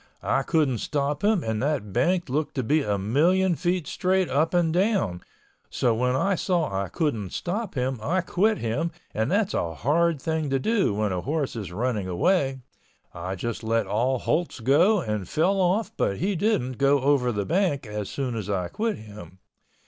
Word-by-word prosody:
I - - +1
couldn't 145 - +1
stop 145 - -2
him 210 -4 +3
and 110 -1 -2
that 135 -8 -1
bank 175 +8 +1
looked 145 +4 -2
to 130 - -1
be 150 +7 +2
a 105 -6 0
million 170 - +2
feet 175 0 -1
straight 185 +3 0
up 155 +4 +2
and 170 -3 +2
down, 180 - +1 0.5
so 120 - +1
when 125 +3 +1
I 195 +9 +2
saw 175 - 0
I 95 0 -1
couldn't 115 - -2
stop 200 +2 -3
him 130 -1 -1
I 180 +11 +1
quit 205 +4 +1
him 130 +9 -1 0.2
and 110 +3 0
that's 205 +1 +1
a 85 -1 -2
hard 160 - +1
thing 160 0 -2
to 135 - +2
do 200 - +1
when 105 -1 0
a 90 -1 -2
horse 145 - -2
is 105 -6 -5
running 105 0 -1
away. 135 - +1 0.5
I 90 +3 -4
just 115 +5 -4
let 115 +1 +1
all 125 +5 +1
holts 165 +4 -1
go 165 - +4
and 105 - -3
fell 190 +5 +2
off 190 +5 +1
but 100 - 0
he 195 +2 0
didn't 160 - 0
go 140 0 +4
over 135 -3 +2
the 105 -3 -2
bank 170 -6 0
as 105 -1 -5
soon 130 -4 -3
as 105 -3 -4
I 90 -3 -1
quit 225 0 -2
him. 105 -4 -12
140 Hz, 190 wpm, -25 LUFS, 110-175 Hz, 0.5 s, go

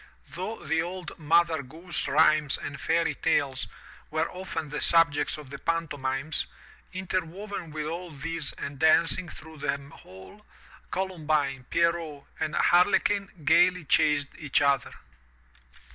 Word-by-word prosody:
Though 185 0 -6
the 160 +2 +1
old 175 0 -6
Mother 165 0 +3
Goose 165 +6 -5
Rhymes 155 -1 +4
and 140 -2 -7
Fairy 165 0 +1
Tales 140 -4 0 0.4
were 160 +1 -1
often 170 -4 -5
the 150 - -4
subjects 165 -4 +3
of 145 -3 -11
the 140 - -7
pantomimes, 145 -3 -1 0.4
interwoven 185 0 -4
with 155 0 -4
all 170 +3 -5
these 160 +1 -4
and 140 -1 -7
dancing 165 +3 +3
through 160 -1 -11
them 140 -1 -3
all, 95 - -14 0.5
Columbine, 155 -8 -1
Pierrot 170 -4 0 0.2
and 155 0 -2
Harle 180 +3 +5
quin 200 -1 -1 0.2
gaily 180 +3 +5
chased 150 -1 +3
each 145 -3 +2
other. 140 -3 +2
160 Hz, 130 wpm, -27 LUFS, 145-170 Hz, 0.5 s, Harle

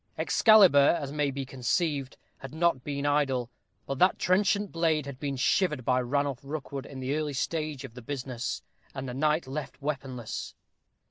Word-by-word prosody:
Excalibur, 180 -9 +6
as 140 -2 -5
may 150 -1 0
be 135 0 -4
conceived, 135 +2 -1 0.2
had 135 +3 -9
not 165 -6 +2
been 140 -1 -3
idle; 135 -4 +1 0.3
but 135 -1 -4
that 185 +1 +4
trenchant 200 +2 +2
blade 160 -3 +1
had 140 -2 -8
been 140 -2 -2
shivered 165 -2 +1
by 125 0 +3
Ranulph 140 +1 -1
Rookwood 140 -1 -5
in 135 - -9
the 130 +2 -2
early 150 -2 -2
stage 155 0 -2
of 130 -4 -9
the 125 - -10
business, 125 -1 -4 0.3
and 135 -1 -5
the 125 - -5
knight 150 +3 +1
left 135 0 -6
weaponless. 135 -5 -5
140 Hz, 170 wpm, -28 LUFS, 130-155 Hz, 0.3 s, Excalibur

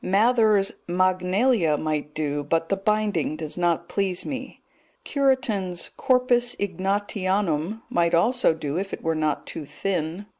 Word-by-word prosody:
Mather's 215 0 +3 0.2
Magnalia 185 - +2
might 150 -1 -3
do, 145 -2 -1
but 165 +3 0
the 195 - +2
binding 205 -6 0
does 155 -1 -6
not 175 -2 0
please 190 -3 -1
me; 265 -2 -6 0.4
Cureton's 245 - 0
Corpus 250 -2 +2
Ignatianum 195 -1 -1
might 170 0 +2
also 225 0 +3
do 155 +1 -3
if 195 0 -5
it - - -6
were 165 - +1
not 155 -2 -1
too 160 - -6
thin. 170 +4 -3
185 Hz, 135 wpm, -24 LUFS, 160-215 Hz, 0.4 s, Mather's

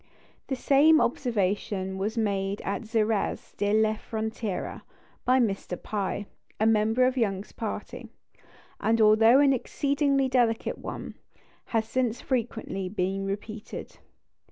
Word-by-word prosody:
The 265 - -1
same 290 +5 +5
observation 200 -6 -1
was 215 +4 -2
made 200 -2 0
at 200 - -2
Xerez 220 -2 -1
de 205 0 0
la 215 0 +3
Frontera 220 -2 -4 0.4
by 255 +1 +4
Mr. 195 -6 -1
Pye, 205 -1 -3 0.3
a 215 - +2
member 220 +3 +3
of 260 +1 0
Young's 200 -4 -1
party; - - -6 0.7
and, 230 +1 +2
although 220 +3 +6
an 280 -1 +5
exceedingly 275 +1 +1
delicate 240 -3 +1
one, - - -6 0.5
has 220 -1 -1
since 245 -1 0
frequently 225 -7 -2
been 195 0 -2
repeated. 210 +2 -6
220 Hz, 120 wpm, -27 LUFS, 200-250 Hz, 0.7 s, although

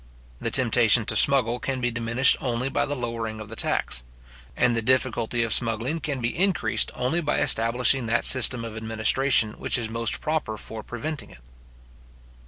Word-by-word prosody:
The 115 - -2
temptation 120 -2 +3
to - - -2
smuggle 125 -3 +3
can 130 +1 -4
be 120 -1 -2
diminished 115 +2 +2
only 125 0 -2
by 135 - -1
the 145 - -4
lowering 115 -3 -5
of 110 -1 -10
the 115 - -8
tax; - - -1 0.5
and 120 - +2
the 115 - -1
difficulty 120 -1 0
of 115 -2 +1
smuggling 120 +7 +1
can 145 -4 -5
be 115 0 -3
increased 190 0 +1
only 130 +8 -2
by 150 -2 -1
establishing 125 0 +2
that 115 +1 0
system 125 -2 +3
of 110 -1 -8
administration 110 +2 +1
which - - 0
is 115 -2 -4
most 115 0 +1
proper 150 -8 -3
for 110 +1 -6
preventing 140 +7 -7
it. - - -16
120 Hz, 175 wpm, -24 LUFS, 115-130 Hz, 0.5 s, temptation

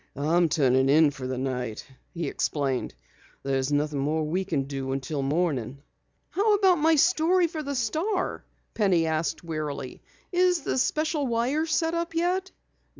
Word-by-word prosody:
"I'm 160 +4 +2
turning 135 -4 +3
in 150 +1 +5
for 135 -2 -6
the 130 0 -3
night," 125 -4 -3 0.3
he 170 -3 -4
explained. 135 - -2 0.5
"There's 135 0 -1
nothing 145 0 0
more 155 +3 0
we 175 +5 -1
can 155 -7 -1
do 135 -1 -4
until 135 +2 -3
morning." 140 -3 -1 0.5
"How 415 +3 +3
about 380 -4 +4
my 320 +2 +4
story 345 +3 +3
to 315 -1 -5
the 280 -1 -4
Star?" 320 - -1 0.3
Penny 190 -6 +2
asked 160 +2 -1
wearily. 155 -5 -5 0.3
"Is 360 -2 +3
the 265 - -1
special 305 +1 0
wire 250 +7 0
set 325 +1 +1
up 335 0 -3
yet?" 365 +3 0
165 Hz, 150 wpm, -26 LUFS, -, 0.5 s, in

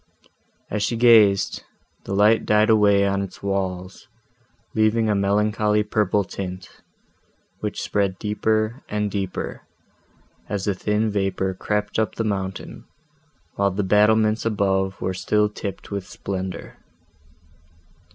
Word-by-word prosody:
As 105 - -1
she 115 - 0
gazed, 110 -4 +5 0.4
the 100 - -3
light 105 +3 +4
died 105 +1 +3
away 100 -2 +4
on 100 0 0
its 100 0 -8
walls, 95 -1 -3 0.7
leaving 110 +1 +2
a 105 - +2
melancholy 105 +1 +1
purple 105 -1 +1
tint, 90 -1 -8 0.8
which - - -4
spread 100 -2 0
deeper 110 +3 -1
and 105 -1 -1
deeper, 95 -2 -4 0.9
as 100 -1 -2
the 100 - +1
thin 105 +3 0
vapour 95 -1 -1
crept 105 +3 -2
up 110 - -1
the 115 - -1
mountain, 95 -3 -4 0.7
while 100 0 +2
the 100 +2 -2
battlements 110 +2 +3
above 95 -3 0
were 95 - -2
still 105 +3 +1
tipped 105 -2 -7
with 100 -2 -4
splendour. 95 -1 -6
105 Hz, 120 wpm, -23 LUFS, 95-105 Hz, 0.9 s, gazed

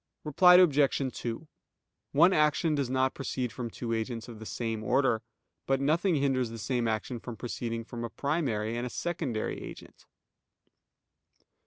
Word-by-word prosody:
Reply 180 +4 +6
Obj. 150 -6 +5 0.2
2: 120 +6 -5 0.6
One 170 +6 +5
action 150 +1 +2
does 140 -4 -1
not 130 0 +1
proceed 130 -3 -3
from 120 0 -5
two 115 +1 -4
agents 115 +1 -3
of 115 -3 -10
the 110 - -8
same 115 -2 -3
order. 125 -2 +2 0.5
But 135 0 +2
nothing 165 +6 +2
hinders 135 -4 +1
the 115 - -7
same 120 +1 -1
action 110 +2 -2
from 115 0 -8
proceeding 115 -1 -4
from 120 +1 -7
a 115 - -3
primary 120 -6 -1
and 120 +1 -2
a - - -6
secondary 150 -8 -3
agent. - - -11
125 Hz, 155 wpm, -29 LUFS, 115-145 Hz, 0.6 s, Reply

